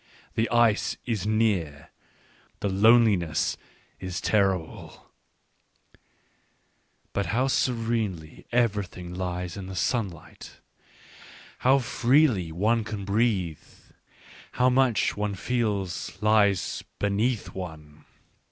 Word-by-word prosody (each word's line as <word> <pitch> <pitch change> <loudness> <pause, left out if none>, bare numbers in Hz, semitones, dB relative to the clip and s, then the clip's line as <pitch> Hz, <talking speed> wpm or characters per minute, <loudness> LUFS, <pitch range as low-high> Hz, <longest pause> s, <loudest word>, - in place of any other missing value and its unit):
The 115 - 0
ice 115 -2 +2
is 105 -4 -2
near, 100 -10 0 0.7
the 100 - -1
loneliness 100 -5 +3 0.4
is 95 -1 -4
terrible 95 -6 -1 0.9
— - - -42
but 100 - -1
how 125 +4 +1
serenely 115 -11 -2
everything 100 -7 -1
lies 90 -1 -4
in 95 -2 -7
the 95 - -7
sunshine! 95 -4 -2 1.2
how 130 +2 +4
freely 120 - +2
one 110 +7 +1
can 105 -2 -6
breathe! 100 -6 0 0.9
how 125 +1 +3
much, 130 -3 +2
one 105 -1 -2
feels, 100 -6 -2
lies 105 -3 +2
beneath 105 +3 -1
one! 80 -5 -9
105 Hz, 95 wpm, -26 LUFS, 90-115 Hz, 1.2 s, how